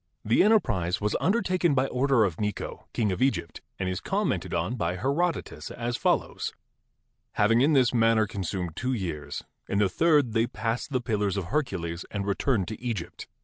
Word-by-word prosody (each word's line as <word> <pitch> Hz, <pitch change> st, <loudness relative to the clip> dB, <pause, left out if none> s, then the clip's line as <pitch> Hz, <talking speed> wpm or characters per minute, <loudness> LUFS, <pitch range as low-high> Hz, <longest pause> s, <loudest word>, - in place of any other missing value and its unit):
The 110 Hz, -, +4 dB
enterprise 105 Hz, -, +2 dB
was 105 Hz, 0 st, 0 dB
undertaken 185 Hz, -5 st, +2 dB
by 130 Hz, 0 st, +3 dB
order 135 Hz, -2 st, +2 dB
of 90 Hz, -6 st, -1 dB
Necho, 105 Hz, -1 st, -4 dB
king 110 Hz, -4 st, 0 dB
of 95 Hz, -, -3 dB
Egypt, 95 Hz, -, 0 dB, 0.2 s
and 95 Hz, -, -2 dB
is 90 Hz, 0 st, -2 dB
commented -, -, -1 dB
on 85 Hz, +7 st, -1 dB
by 90 Hz, -6 st, -1 dB
Herodotus 145 Hz, -, -1 dB
as 120 Hz, 0 st, -3 dB
follows: -, -, 0 dB, 0.8 s
"Having 115 Hz, +3 st, +3 dB
in 150 Hz, +4 st, +4 dB
this 130 Hz, -3 st, +4 dB
manner 115 Hz, -2 st, +4 dB
consumed 95 Hz, -5 st, -4 dB
two 130 Hz, +1 st, -1 dB
years, 75 Hz, -, -4 dB, 0.3 s
in 100 Hz, -, 0 dB
the 105 Hz, -1 st, +4 dB
third 150 Hz, -, +3 dB
they 115 Hz, +1 st, +2 dB
passed 115 Hz, +5 st, -3 dB
the 130 Hz, -3 st, 0 dB
Pillars 105 Hz, -4 st, 0 dB
of 90 Hz, -3 st, -3 dB
Hercules 90 Hz, -, -1 dB
and 100 Hz, -1 st, -3 dB
returned 100 Hz, 0 st, 0 dB
to 110 Hz, -, -7 dB
Egypt. 110 Hz, -9 st, -4 dB
110 Hz, 175 wpm, -27 LUFS, 95-130 Hz, 0.8 s, The